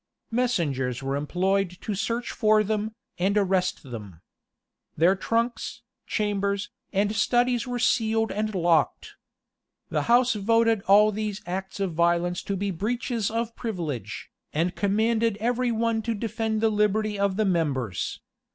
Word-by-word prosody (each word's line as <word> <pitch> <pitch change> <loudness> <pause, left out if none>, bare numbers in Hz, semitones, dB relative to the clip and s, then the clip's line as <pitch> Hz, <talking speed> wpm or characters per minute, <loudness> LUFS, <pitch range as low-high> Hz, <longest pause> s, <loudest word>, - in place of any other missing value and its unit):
Messengers 145 - 0
were 135 +1 -1
employed 180 +5 0
to 215 - -3
search 230 +4 -2
for 215 -1 +3
them, 215 +1 -2 0.2
and 195 +3 +2
arrest 190 -2 +1
them. 105 - -9 0.8
Their 175 +5 +5
trunks, 230 +5 -2 0.2
chambers, 200 -1 -1 0.2
and 205 +2 +1
studies 240 +2 +2
were 245 0 -2
sealed 225 -2 +2
and 215 0 -2
locked. 170 -3 +1 0.8
The - - 0
house 245 +1 +5
voted 225 +1 +2
all 210 +2 +6
these 210 0 -4
acts 190 +2 -5
of 195 -4 -1
violence 170 +1 +1
to 200 - -2
be 200 +1 -1
breaches 230 +4 -1
of 230 +1 -2
privilege, 170 - -5 0.2
and 170 +4 0
commanded 220 +2 +1
every 245 +2 +1
one 230 0 0
to 230 0 -2
defend 220 0 -2
the 225 -1 +3
liberty 210 0 +1
of 200 -1 +1
the 215 - +2
members. 140 - -1
210 Hz, 140 wpm, -26 LUFS, 180-225 Hz, 0.8 s, all